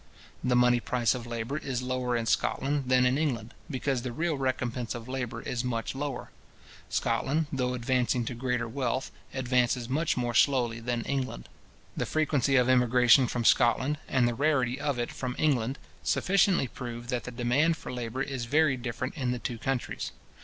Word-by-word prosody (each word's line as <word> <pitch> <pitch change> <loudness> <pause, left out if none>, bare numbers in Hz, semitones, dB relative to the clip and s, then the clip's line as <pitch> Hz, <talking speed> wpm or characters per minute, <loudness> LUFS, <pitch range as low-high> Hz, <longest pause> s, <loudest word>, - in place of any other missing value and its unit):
The 125 0 +2
money 125 0 +5
price 120 -1 +1
of 125 -2 -6
labour 120 +5 -3
is 125 -4 -3
lower 125 -1 -1
in 115 - -2
Scotland 140 +4 0
than 125 0 +5
in 130 +3 +2
England, 120 -7 -2 0.2
because 135 -2 -1
the 125 0 -4
real 165 +5 -1
recompence 125 -3 -2
of 115 0 -7
labour 130 -2 -4
is 125 0 -2
much 115 -3 -2
lower: 135 -1 -4 0.6
Scotland, 155 +4 0
though 125 -1 0
advancing 125 0 +1
to 125 - -3
greater 125 -1 -1
wealth, 130 +1 -2 0.2
advances 125 -2 +1
much 155 +5 0
more 120 -1 -1
slowly 120 -2 +3
than 120 0 -2
England. 130 - -3 0.5
The - - -2
frequency 145 -4 +1
of 125 -2 +4
emigration 125 +1 +5
from 120 0 -2
Scotland, 130 +6 +3
and 130 -3 +2
the 120 - 0
rarity 135 -1 +1
of 140 -2 -1
it 120 - -2
from 125 -1 -4
England, 135 -3 +1 0.2
sufficiently 185 -6 +2
prove 120 -1 -7
that 125 -2 -2
the 125 - -5
demand 130 +7 +2
for - - -7
labour 125 +2 -3
is 135 -4 -4
very 145 +1 +3
different 125 +1 -4
in 130 -5 -1
the 125 - 0
two 120 -1 -5
countries. 135 +1 -3
125 Hz, 175 wpm, -29 LUFS, 120-135 Hz, 0.6 s, money